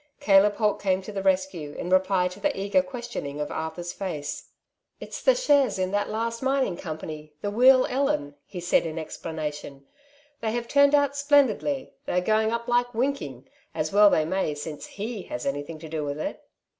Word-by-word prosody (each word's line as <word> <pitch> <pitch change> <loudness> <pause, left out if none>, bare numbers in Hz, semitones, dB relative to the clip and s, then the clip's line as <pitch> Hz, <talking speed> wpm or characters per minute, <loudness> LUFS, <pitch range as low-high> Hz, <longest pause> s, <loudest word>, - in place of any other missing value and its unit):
Caleb 205 -5 +5
Holt 210 -2 +1
came 190 -1 +1
to 210 - -7
the 200 -1 -3
rescue 185 -5 0
in 180 - -5
reply 185 -1 +3
to 180 - -11
the 290 -7 -1
eager 200 +8 +3
questioning 240 - -6
of 150 - -3
Arthur's 170 +2 -4
face. 160 -7 -5 0.5
'^It's - - -7
the - - +5
shares 285 - +3
in 185 0 -1
that 205 0 0
last 230 +1 -2
mining 265 -7 +1
company, 155 -2 -7
the 205 - -1
Wheal 255 +4 +6
Ellen," 265 - 0
he 180 - -7
said 175 -1 +2
in 160 0 -6
explanation; 150 -3 -6 0.5
"they 220 -1 -2
have 240 0 -2
turned 285 +2 +5
out 285 -1 +2
splendidly; 285 -1 +2
they - - -2
are 180 - +3
going 220 +3 +2
up 235 +1 -3
like 245 0 +1
winking; 225 - -2 0.3
as 155 +3 -2
well 205 0 +7
they 155 - +2
may 165 -3 -1
since 150 0 -7
he 215 +1 -5
has 120 - -4
anything 145 +3 -3
to 160 +1 -10
do 155 -1 -3
with 145 0 -4
it." - - -4
195 Hz, 190 wpm, -26 LUFS, 160-245 Hz, 0.5 s, well